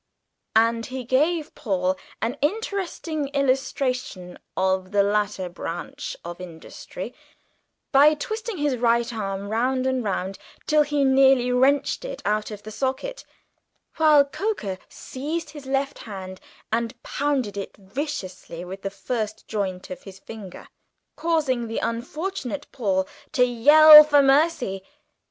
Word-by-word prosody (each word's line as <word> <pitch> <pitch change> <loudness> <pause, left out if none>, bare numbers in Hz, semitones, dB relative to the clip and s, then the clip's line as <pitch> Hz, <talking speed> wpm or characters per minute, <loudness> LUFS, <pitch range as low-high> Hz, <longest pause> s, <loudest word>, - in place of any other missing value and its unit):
And 230 +1 +3
he 255 0 -5
gave 300 +6 +1
Paul 185 -4 -1 0.3
an 230 +4 -1
interesting 340 -4 -2
illustration 255 -8 -1 0.2
of 190 0 +1
the 200 0 +3
latter 205 -2 0
branch 175 -1 -6
of 175 +1 -7
industry 165 -3 -8 0.8
by 295 +2 +6
twisting 445 +2 -4
his 290 -4 0
right 235 0 +2
arm 200 -2 -4
round 255 +4 0
and 260 -1 0
round 195 -1 -3 0.3
till 305 0 +4
he 295 -1 +1
nearly 265 -2 +4
wrenched 275 - +2
it - - -7
out 210 0 0
of 210 -1 -9
the 215 - -8
socket, 270 - -3 0.7
while 305 -3 +6
Coker 275 - -3
seized 305 +6 -5
his 290 -3 -10
left 275 +1 -1
hand 190 -3 -8 0.3
and 235 +2 -1
pounded 275 -8 -1
it 200 -1 -6
vigorously 190 - -6
with 190 +2 -8
the 195 - -3
first 215 +2 -4
joint 190 -4 -3
of 185 - -7
his 195 -1 -11
forefinger, 195 -2 -10 0.5
causing 300 -7 0
the 225 - -4
unfortunate 285 +4 -3
Paul 190 -6 0 0.3
to 250 -4 +4
yell 300 +6 +9
for 290 -1 +4
mercy. 270 - +2
250 Hz, 130 wpm, -24 LUFS, 200-290 Hz, 0.8 s, yell